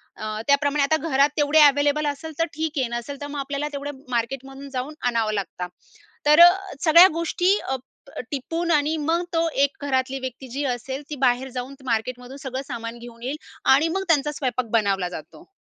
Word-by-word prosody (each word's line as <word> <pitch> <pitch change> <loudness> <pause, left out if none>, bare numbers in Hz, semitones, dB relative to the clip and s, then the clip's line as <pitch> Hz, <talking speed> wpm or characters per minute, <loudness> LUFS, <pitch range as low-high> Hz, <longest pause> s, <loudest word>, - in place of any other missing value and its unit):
अ, 215 0 -5
त्याप्रमाणे 285 0 +3
आता 315 +3 +2
घरात 275 +2 +4
तेवढे 295 +1 +4
अव्हेलेबल 290 +1 +4
असेल 290 +3 -4
तर 330 - +3
ठीक 315 0 -2
आहे, 255 - +1
नसेल 240 +4 -6
तर 285 - -4
मग 290 0 -5
आपल्याला 280 +2 -3
तेवढं 280 -1 -5
मार्केटमधून 270 +3 -4
जाऊन 260 +4 -3
आणावं 225 -3 +1
लागतं. 185 -3 -4 0.6
तर 300 +3 +6
अ, 350 - +10 0.3
सगळ्या 340 +3 +9
गोष्टी 355 +4 +1
अ, 265 - 0 0.4
अ, - - -3
टिपून 330 +5 -3
आणि 305 +1 +2
मग 325 +3 0
तो 330 0 +2
एक 280 - +1
घरातली 260 0 0
व्यक्ती 260 0 -7
जी 280 +4 -3
असेल 265 +4 -6
ती 295 - -4
बाहेर 250 +2 +1
जाऊन 250 +2 -5
मार्केटमधून 250 +2 -3
सगळं 265 0 -4
सामान 230 +1 -6
घेऊन 235 -1 -12
येईल 265 +5 -3 0.4
आणि 305 +4 +3
मग 385 +4 -1
त्यांचा 295 -2 +2
स्वयंपाक 255 -4 -2
बनवला 195 -5 +1
जातो. 175 - -10
275 Hz, 185 wpm, -23 LUFS, 245-300 Hz, 0.6 s, अ